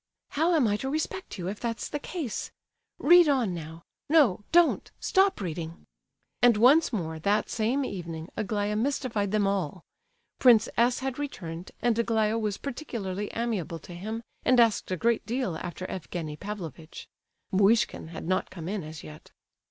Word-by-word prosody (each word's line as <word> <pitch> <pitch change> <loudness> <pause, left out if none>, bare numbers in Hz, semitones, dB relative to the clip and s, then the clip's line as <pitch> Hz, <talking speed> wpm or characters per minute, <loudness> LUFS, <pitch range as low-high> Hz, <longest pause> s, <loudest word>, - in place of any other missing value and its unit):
"How 330 +4 +2
am 280 -7 +4
I 205 0 +1
to 265 - -3
respect 315 - -3
you, 175 -1 -4
if 205 +2 -4
that's 230 -1 -3
the 295 - -4
case? 290 - -4 0.5
Read 345 0 +6
on 250 -9 +2
now. 165 0 -8 0.3
No—don't! 305 - +4
Stop 385 0 +3
reading!" 170 -3 -5 0.6
And 240 -3 +6
once 275 +9 +5
more, 160 -8 -3
that 200 +5 +1
same 240 +5 0
evening, 165 -5 -6
Aglaya 210 -1 -1
mystified 225 -4 -1
them 210 -1 +2
all. 190 -4 -1 0.6
Prince 235 -3 +6
S. 240 +2 +2
had 265 0 -3
returned, 175 - -5
and 235 -2 +2
Aglaya 225 -1 +1
was 210 -3 -1
particularly 210 -8 -4
amiable 215 -8 -2
to 175 - -11
him, 215 +6 -5 0.2
and 255 -1 +4
asked 230 -3 +3
a 185 - -1
great 235 +5 +1
deal 235 -7 -1
after 175 +3 -6
Evgenie 165 -4 -5
Pavlovitch. 170 -5 -8 0.4
(Muishkin 205 0 +3
had 160 0 -7
not 185 +1 0
come 170 -3 -8
in 200 -1 -3
as 155 0 -9
yet.) 155 0 -12
210 Hz, 160 wpm, -28 LUFS, 180-245 Hz, 0.6 s, Read